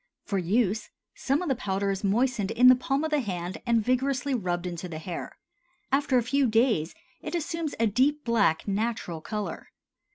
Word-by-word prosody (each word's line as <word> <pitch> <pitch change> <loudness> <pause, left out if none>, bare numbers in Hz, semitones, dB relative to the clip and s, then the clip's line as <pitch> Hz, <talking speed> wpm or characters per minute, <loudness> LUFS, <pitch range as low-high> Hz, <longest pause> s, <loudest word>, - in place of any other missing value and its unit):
For 195 - -1
use, 205 +4 0 0.2
some 275 +6 0
of - - -4
the 270 - +2
powder 195 -2 -1
is 195 +1 -4
moistened 215 0 +1
in 250 +1 +6
the 255 - +8
palm 270 +3 -1
of 315 - -2
the 300 - +3
hand 185 -5 -4
and 230 -2 +2
vigorously 265 +2 0
rubbed 180 -6 -1
into 175 0 -5
the 160 - -6
hair; 170 +2 -6 0.5
after 275 -1 +2
a 245 - +2
few 275 +2 +2
days 225 -8 +2 0.3
it 310 +3 -4
assumes 330 -2 -3
a 230 - +3
deep 265 +8 +2
black, 210 -9 +2
natural 200 -5 -2
color. 210 +4 -5
230 Hz, 185 wpm, -27 LUFS, 195-270 Hz, 0.5 s, the